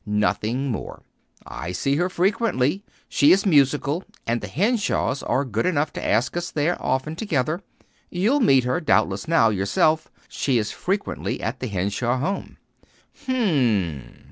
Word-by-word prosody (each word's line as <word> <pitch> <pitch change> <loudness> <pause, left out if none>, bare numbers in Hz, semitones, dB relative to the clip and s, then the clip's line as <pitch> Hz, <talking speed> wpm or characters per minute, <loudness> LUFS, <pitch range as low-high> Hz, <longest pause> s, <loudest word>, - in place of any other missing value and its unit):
"Nothing 110 +5 0
more. 110 - -6 0.4
I 85 - -6
see 140 +10 0
her 175 +3 +1
frequently. 185 - 0 0.2
She 145 - +4
is 195 +3 +4
musical, 145 0 +2 0.2
and 115 +1 -1
the - - -5
Henshaws 205 - 0
are 140 - 0
good 115 - -1
enough 155 -4 0
to - - -6
ask 120 +6 +1
us 175 0 -2
there 155 +4 0
often 130 +4 -1
together. 165 - -1 0.5
You 190 +6 +1
will 290 - +3
meet 135 - +4
her, 125 +6 0
doubtless, 100 - +1
now, 160 -9 +4
yourself. 105 +11 +1 0.2
She 135 -3 0
is 110 -2 -1
frequently 200 +2 -3
at 120 +4 -3
the 130 - -3
Henshaw 100 +5 -1
home." 150 +10 -3 0.7
"Hm 260 - +1
m." 110 - 0
140 Hz, 155 wpm, -23 LUFS, 115-175 Hz, 0.7 s, She